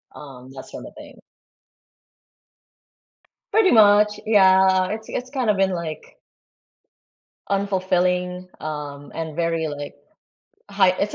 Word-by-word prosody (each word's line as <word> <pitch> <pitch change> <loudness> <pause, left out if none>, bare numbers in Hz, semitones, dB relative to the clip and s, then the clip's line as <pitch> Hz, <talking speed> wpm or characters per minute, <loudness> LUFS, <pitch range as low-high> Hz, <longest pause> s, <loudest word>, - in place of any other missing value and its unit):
um, 130 -3 -12
that 130 - -10
sorta - - -10
thing. - - -13 2.3
Pretty 420 -2 +4
much, 210 -1 +5
yeah, 190 -3 +4
it's 220 +2 -6
it's 250 +1 -5
kinda 250 -6 0
been 195 -1 +1
like 170 -3 -6 1.3
unfulfilling, 180 -2 -1
um, 145 -2 -7
and 160 -2 -5
very, 165 -1 -1
like, 145 -1 -7 0.8
high 195 -2 +4
it's 205 - -2
185 Hz, 100 wpm, -22 LUFS, 160-205 Hz, 2.3 s, much